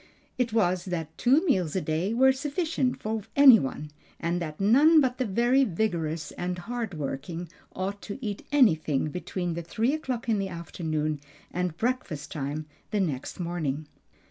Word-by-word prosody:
It 245 -2 +1
was 185 -5 +1
that 165 -4 -4
two 275 +8 +3
meals 185 - +1
a - - +2
day 165 +6 -1
were 260 +3 +5
sufficient 280 -1 -1
for 220 0 -2
any 270 -5 +9
one, 150 +3 -4 0.3
and 170 +1 -1
that 155 -2 -5
none 280 +11 +6
but 255 -3 +1
the 255 - +1
very 240 +7 +3
vigorous 170 - -1
and 180 0 -3
hard 230 +1 -4
working 160 +4 -4 0.3
ought 195 +2 -3
to 205 - -6
eat 210 -6 -4
anything 160 - +3
between 180 0 -3
three 225 - 0
o'clock 260 -7 -3
in 220 -3 +2
the 195 -1 -2
afternoon 155 -3 -3 0.3
and 180 -2 -2
breakfast 210 - -2
time 150 -1 -3 0.2
the 210 - 0
next 150 -7 -2
morning. 160 -4 -2
185 Hz, 160 wpm, -27 LUFS, 160-245 Hz, 0.3 s, any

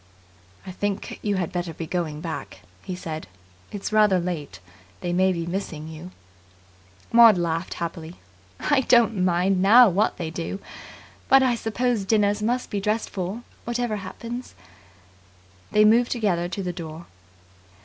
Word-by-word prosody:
"I 185 - -6
think 205 +2 -4
you 205 -1 0
had 185 -1 -2
better 175 -2 -4
be 165 - -5
going 160 -3 -3
back," 160 -3 -6 0.2
he 185 - -5
said. 160 - -6 0.4
"It's 205 +1 -5
rather 210 -3 +5
late. 160 - -4 0.4
They 175 - -2
may 185 +1 +3
be 170 -2 -3
missing 170 -4 -4
you." 160 +3 -9 1.0
Maud 230 -4 +8
laughed 170 0 -2
happily. 170 0 -6 0.4
"I 285 -2 +2
don't 230 -6 +3
mind 180 +1 +2
now 230 +4 +8
what 195 +4 +1
they 165 -2 -4
do. 165 +3 -4 0.7
But 270 0 +7
I 255 -2 +3
suppose 230 -1 -1
dinners 205 0 +2
must 245 +4 -1
be 205 - -1
dressed 215 +2 -1
for, 195 +5 -4 0.2
whatever 240 -2 -2
happens." 230 +6 -7 1.2
They 210 0 +5
moved 235 +3 +4
together 185 -7 0
to 195 +1 -4
the 180 -1 -3
door. 165 -1 -8
190 Hz, 150 wpm, -24 LUFS, 170-220 Hz, 1.2 s, Maud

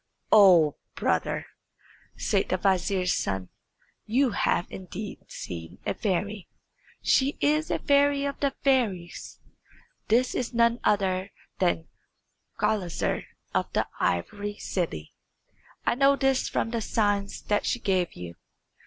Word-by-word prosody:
"Oh, 180 -8 +7 0.2
brother," - - 0 0.7
said - - 0
the - - +1
vizier's 185 -1 +1
son, 95 -2 -2 0.6
"you 250 +3 +2
have 175 - +1
indeed 195 +2 -7
seen 85 -1 -7
a - - 0
fairy. 200 -1 -2 0.6
She 275 +2 +3
is 305 +2 +2
a - - +1
fairy 285 0 +3
of 280 -1 -3
the 280 -1 0
fairies. 215 -11 0 0.7
This 245 +3 +3
is 250 -1 -3
none 235 0 +3
other 190 -2 +1 0.3
than 175 -3 +1 0.7
Gulizar 185 -6 0 0.3
of - - 0
the - - +1
Ivory 205 - -1
City. 160 - -3 0.7
I - - +3
know 275 +3 +4
this 270 -1 +1
from 225 - -1
the 230 -1 -1
signs 205 -2 0
that 205 0 0
she - - +1
gave 185 -5 0
you. 85 -1 -9
205 Hz, 125 wpm, -27 LUFS, 180-250 Hz, 0.7 s, Oh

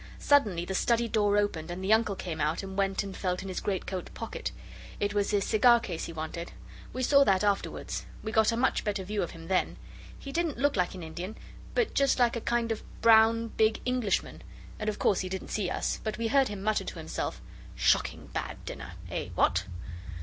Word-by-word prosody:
Suddenly 205 -12 +3
the 190 - -3
study 235 +4 +2
door 205 -2 +2
opened 190 -6 0
and 180 +2 -5
the 200 +3 +4
Uncle 220 -2 +2
came 165 -4 -4
out 155 +5 0
and 190 0 -6
went 195 -1 +1
and 195 -1 -7
felt 180 -1 -2
in 195 - -6
his 185 - -3
greatcoat 190 -2 -3
pocket. 225 - -4 0.5
It 205 0 0
was 205 -1 +1
his 205 -2 +2
cigar 235 +2 +5
case 175 -7 -4
he - - -6
wanted. 165 +2 -5 0.4
We 255 - -3
saw 280 +2 +6
that 195 -3 +3
afterwards. 205 -1 -1 0.2
We 220 - -3
got 220 0 +4
a 230 - -1
much 260 +2 +2
better 205 -2 -1
view 205 +2 -2
of 175 - -2
him 165 -1 -10
then. 190 -1 +1 0.4
He 275 - -8
didn't 330 -3 -1
look 285 +3 +2
like 180 -1 0
an 180 - -7
Indian 175 +6 -6 0.4
but 475 -3 +1
just 275 -1 +3
like 245 -2 +3
a 235 - -3
kind 235 0 0
of 220 - -2 0.2
brown, 230 0 +6
big 220 0 +2
Englishman, 250 -5 0 0.4
and 215 0 -1
of 210 - -3
course 195 - +2
he 185 - -3
didn't 190 0 -5
see 200 -4 -1
us, - - -2
but 215 -1 -3
we 230 -1 -1
heard 275 0 +4
him 205 -2 -6
mutter 215 0 +1
to - - -7
himself - - -4 0.4
'Shocking - - +1
bad - - -3
dinner! - - -7 0.2
Eh! - - -3
what? - - +2
205 Hz, 215 wpm, -29 LUFS, 185-230 Hz, 0.5 s, saw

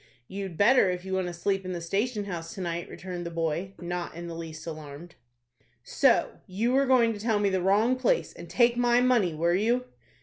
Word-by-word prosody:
"You'd 190 -3 -6
better 230 -1 +5
if 180 0 -4
you 190 - -4
want 190 -1 0
to 175 - -5
sleep 195 +3 -1
in 185 0 -4
the 175 - -4
station 205 +5 -2
house 170 -1 -6
to 195 - -6
night," 170 -1 -3
returned 180 -1 -6
the 170 - -4
boy, 170 +3 -3
not 175 -1 -4
in 170 +1 -7
the 170 - -6
least 165 -1 -8
alarmed. 155 +1 -8 0.7
"So - - +2
you 215 +6 -1
were 275 +1 +3
going 240 -3 +4
to 210 - -8
tell 220 0 +1
me 205 -1 +2
the 190 -1 0
wrong 210 +7 +3
place, 475 - 0
and - - -11
take 240 -1 +3
my 245 0 +3
money, 240 -10 +2
were 170 +2 +1
you?" 235 +6 +1
190 Hz, 215 wpm, -27 LUFS, 170-230 Hz, 0.7 s, better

